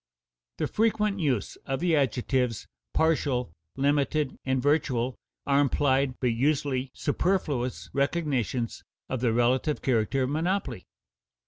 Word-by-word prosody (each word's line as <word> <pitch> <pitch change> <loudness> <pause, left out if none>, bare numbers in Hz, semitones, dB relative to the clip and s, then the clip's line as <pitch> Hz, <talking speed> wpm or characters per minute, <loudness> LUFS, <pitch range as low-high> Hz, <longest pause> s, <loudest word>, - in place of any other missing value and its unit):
The - - 0
frequent 210 -2 +1
use 130 - -1
of 135 0 -1
the 170 0 +2
adjectives 125 -3 0 0.3
partial, 140 - +1 0.2
limited, 145 +1 +1
and 130 0 0
virtual 130 -4 +1 0.3
are 140 +1 +4
implied 135 -1 +2
but 125 -2 +1
usually 135 0 0
superfluous 145 -6 -1
recognitions 140 -5 -1 0.3
of 130 - -2
the 120 -3 +2
relative 125 +6 +1
character 130 +1 +1
of 130 - -1
monopoly. 160 - -1
135 Hz, 115 wpm, -27 LUFS, 125-150 Hz, 0.3 s, are